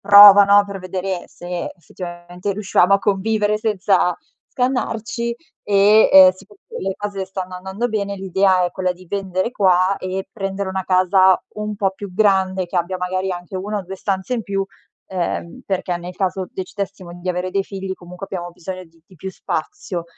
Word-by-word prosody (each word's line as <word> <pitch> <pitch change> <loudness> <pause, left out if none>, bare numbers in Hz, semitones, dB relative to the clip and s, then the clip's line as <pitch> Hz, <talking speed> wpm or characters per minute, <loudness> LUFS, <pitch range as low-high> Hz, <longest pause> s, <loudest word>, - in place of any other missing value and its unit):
prova, 205 0 +10
no, 200 +1 +5
per 195 -1 -7
vedere 185 0 -4
se 175 0 -6
effettivamente 175 +2 -7
riuscivamo 195 -1 +3
a 200 - +3
convivere 210 +1 +1
senza 200 -4 +1 0.3
scannarci 235 -2 -2 0.3
e, 205 +2 +5
ehm, 190 -1 +9
siccome 195 +2 -17
poi - - -7
le 195 - -1
cose 200 -2 -4
stanno 185 -1 -6
andando 190 +6 -3
bene, 200 -3 -2
l'idea 190 -1 +2
è 175 - -1
quella 185 -1 -1
di 180 0 -17
vendere 190 +2 -2
qua 190 -3 +3
e 185 +1 -4
prendere 195 -1 -3
una 190 0 -2
casa 185 0 +4 0.2
un 210 0 -3
po' 195 -2 +1
più 195 -1 -9
grande, 190 -2 +2
che 180 - -5
abbia 175 +2 0
magari 185 +1 -2
anche 175 +1 -8
1 205 +2 -3
o - - -5
2 190 +1 -8
stanze 190 +3 -2
in 230 - -2
più, 195 -1 -2 0.4
ehm, 180 +4 -3
perché 180 -2 -1
nel 180 +1 -8
caso 190 -1 -2
decidessimo 190 -2 -6
di 185 - -5
avere 180 +1 -1
dei 195 +1 0
figli 195 -1 -5
comunque 180 +2 -10
abbiamo 175 -3 -5
bisogno 185 +2 -7
di 165 -1 -25
di 190 - -19
più 190 +4 -6
spazio. 175 - -4
190 Hz, 180 wpm, -20 LUFS, 185-200 Hz, 0.4 s, prova